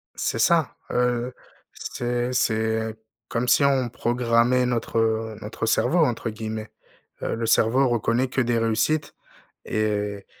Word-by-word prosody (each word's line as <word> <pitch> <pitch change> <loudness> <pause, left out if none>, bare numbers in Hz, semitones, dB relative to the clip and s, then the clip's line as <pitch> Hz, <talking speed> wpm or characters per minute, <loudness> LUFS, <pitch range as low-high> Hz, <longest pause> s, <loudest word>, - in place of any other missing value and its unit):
C'est 115 - -2
ça, 160 +4 +3 0.2
heu, 125 0 0 0.4
c'est 120 +1 -3
c'est 110 -1 0 0.3
comme 125 +1 -1
si 140 - +4
on 135 -3 +3
«programmait» 120 +1 +2
notre, 120 -2 -2
heu, 110 -1 0
notre 110 +1 -4
cerveau 165 +9 +2
entre 120 -7 +1
guillemets, 110 0 -5 0.5
heu, - - -2
le 115 0 -2
cerveau 125 +4 +3
reconnaît 120 +2 +1
que 130 - -2
des 120 -1 +1
réussites, 115 +7 0 0.5
et- 105 -2 -2
115 Hz, 135 wpm, -24 LUFS, 110-125 Hz, 0.5 s, si